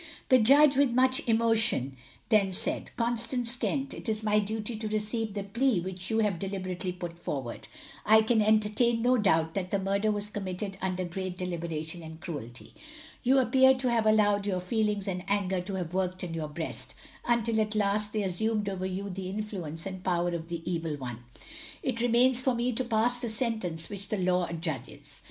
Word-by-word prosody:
The 255 - +7
Judge, 280 +5 +6
with 280 -1 +5
much 260 +1 +4
emotion, 220 - +2 0.3
then 205 -4 +4
said - - -2
Constance 235 +1 +1
Kent, 275 +1 -2
it - - -6
is 215 0 -1
my 210 0 +3
duty 215 +2 -3
to 220 0 -4
receive 215 0 -1
the 200 - -2
plea 235 +1 +1
which 185 +1 -5
you 220 - +1
have 200 -5 0
deliberately 185 -2 -3
put 175 -1 -7
forward. 135 -8 -5 0.4
I 220 +1 +6
can 220 0 +3
entertain 215 +2 +2
no 250 0 +4
doubt 160 -5 +2
that 185 -2 -3
the 200 - +1
murder 200 +2 +1
was 205 0 -2
committed 195 -1 -4
under 185 -1 -1
great 185 +1 -5
deliberation 170 -2 -4
and 160 0 -10
cruelty. 140 -9 -8 0.5
You 260 +2 +3
appear 265 0 +5
to 255 -1 0
have 225 -2 +2
allowed 205 -2 +3
your 185 -2 0
feelings 210 +1 -1
and 180 -2 -3
anger 195 -2 0
to 190 +2 -5
have 180 -2 -4
worked 185 -1 -1
in 170 -2 -4
your 155 -2 -3
breast, 135 -6 -6 0.3
until 230 -2 +2
at 215 0 -1
last 205 0 +1
they 215 -1 -1
assumed 210 +3 0
over 190 -1 -3
you 190 +2 -4
the 190 -1 -5
influence 190 -6 -5
and 190 -1 -6
power 175 -1 +1
of 170 -1 -5
the 170 -1 -4
Evil 165 -4 -2
One. 125 -4 -6 0.6
It 230 -3 -1
remains 245 +1 +4
for 255 -1 +1
me 240 +1 0
to 255 - -1
pass 240 +1 +1
the 240 -2 -3
sentence 220 -8 -1
which 200 -1 -6
the 215 - -1
law 180 -1 +1
adjudges. 160 -6 -6
200 Hz, 190 wpm, -29 LUFS, 180-225 Hz, 0.6 s, The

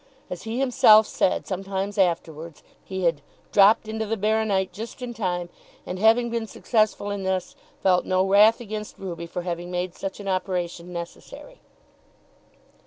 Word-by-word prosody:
As 180 - -5
he 230 - -3
himself 250 -5 +6
said 185 - 0
sometimes 195 +1 -3
afterwards, 165 -3 -1 0.2
he 190 -1 -5
had 165 -4 +1 0.3
"dropped 205 +2 +5
into 220 0 -3
the 225 +1 -1
baro 215 +2 +1
nite" 190 -3 0
just 225 +5 -8
in 240 -1 -5
time, 180 -5 -2 0.4
and, 180 +1 -5
having 230 +3 +4
been 230 -1 -2
successful 215 -2 0
in 200 -1 -3
this, 190 -1 -2 0.3
felt 185 -2 +4
no 185 0 +1
wrath 210 +3 +6
against 215 -2 -7
Ruby 170 -3 -6
for 175 +1 -5
having 175 0 -4
made 180 0 -3
such 195 +2 -6
an 200 - -8
operation 180 -2 -2
necessary. 175 - -9
195 Hz, 160 wpm, -24 LUFS, 180-220 Hz, 0.4 s, himself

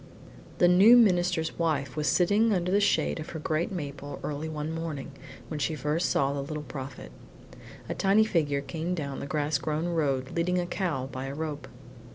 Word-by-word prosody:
II - - -19 0.2
The 175 - +5
new 195 +7 +8
minister's 175 -7 +2
wife 145 -5 0
was 150 -1 -1
sitting 205 +10 +3
under 180 -2 0
the 200 - +4
shade 200 - +1
of 155 - -7
her 160 - -6
great 155 +3 -1
maple 145 -5 -6
early 150 +2 -3
one 155 0 -4
morning, 160 -4 -5 0.4
when 155 - -5
she 155 +2 0
first 150 +4 0
saw 140 0 +1
the 140 - -2
Little 150 +2 -5
Prophet. 135 - -8 0.8
A - - -2
tiny 200 +3 +4
figure 145 -8 0
came 165 +4 -3
down 140 -5 -4
the - - -5
grass 145 -1 0
grown 155 +4 -2
road 140 -6 0
leading 180 +2 +1
a 175 - 0
cow 170 -8 -2
by 130 0 -6
a 135 - -5
rope. 150 -1 -4
155 Hz, 195 wpm, -28 LUFS, 140-175 Hz, 0.8 s, new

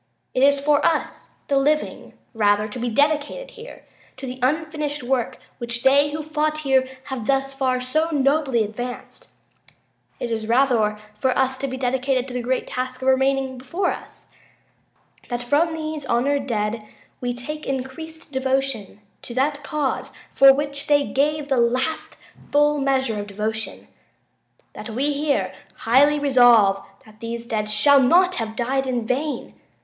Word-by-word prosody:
It 255 - 0
is 280 +1 +5
for 290 +1 +2
us 325 - -1 0.2
the 280 - +2
living, 300 +2 -1 0.2
rather, 210 -1 +2
to 220 +4 -7
be 240 +1 -1
dedicated 300 - 0
here 475 0 -12 0.3
to 265 - -7
the 255 0 -6
unfinished 300 +1 -1
work 245 -1 -1 0.2
which 235 -1 -4
they 280 +2 +5
who 305 +1 -4
fought 305 0 -1
here 265 -2 +2
have 265 -6 -6
thus 270 0 +1
far 260 -2 0
so 310 +6 0
nobly 275 -5 +2
advanced. 245 +4 -7 0.9
It 235 - -3
is 220 -1 -2
rather 230 -4 +2 0.2
for 255 +5 0
us 265 0 +1
to 275 - -2
be 260 0 -5
here - - -11
dedicated 260 0 0
to 255 - -8
the 250 - -2
great 255 +2 -1
task 255 0 -5
remaining 265 0 +1
before 340 +10 -1
us.. - - -10 1.0
.that 240 -1 -3
from 295 +7 +2
these 310 -2 -4
honored 275 +3 +1
dead 215 -1 -2 0.4
we 245 -1 -2
take 300 +6 -6
increased 275 +5 -6
devotion 265 -6 -2 0.2
to 235 - -9
that 285 +2 0
cause 295 -3 -2 0.2
for 275 0 +8
which 280 0 -2
they 290 -1 +4
gave 295 +2 0
the 270 -2 +1
last 255 +7 -1 0.4
full 295 0 +3
measure 265 -5 0
of 205 - -5
devotion... 215 +2 -4 0.9
that - - -8
we 270 +6 0
here 280 -9 0 0.3
highly 280 +6 +5
resolve 240 -8 +5 0.2
that 215 -1 -18
these 230 0 -5
dead 215 -2 -2
shall 275 +7 +5
not 360 +8 +4
have 220 -1 -3
died 265 +3 -1
in 245 -3 -1
vain. 275 +5 -2
265 Hz, 155 wpm, -22 LUFS, 240-290 Hz, 1.0 s, for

